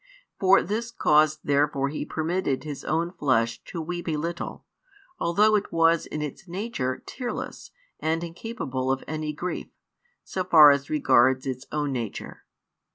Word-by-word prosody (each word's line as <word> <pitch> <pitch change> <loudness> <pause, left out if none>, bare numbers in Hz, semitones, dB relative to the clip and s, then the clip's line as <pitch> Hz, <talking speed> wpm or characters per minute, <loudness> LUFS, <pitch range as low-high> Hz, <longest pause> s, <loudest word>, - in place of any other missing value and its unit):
For 195 -1 +5
this 220 +5 -2
cause 155 -8 +3
therefore 140 -1 +1
He 150 0 -4
permitted 160 -3 -1
His 150 -3 -6
own 165 +2 0
flesh 115 -8 0
to 170 - -6
weep 175 +2 -5
a 155 - 0
little, 170 +3 -5 0.5
although 210 +6 +3
it 205 - -1
was 165 0 +3
in 150 - -4
its 150 +6 -7
nature 175 - -3
tearless 250 -2 -6 0.3
and 160 +1 -1
incapable 165 - -3
of 135 - -1
any 155 0 -3
grief, 175 +5 -4 0.6
so 185 - -3
far 155 -5 +8
as 140 -1 0
regards 130 -3 +3
its 130 -1 -4
own 150 -2 -1
nature. 115 -5 -5
155 Hz, 150 wpm, -26 LUFS, 140-175 Hz, 0.6 s, far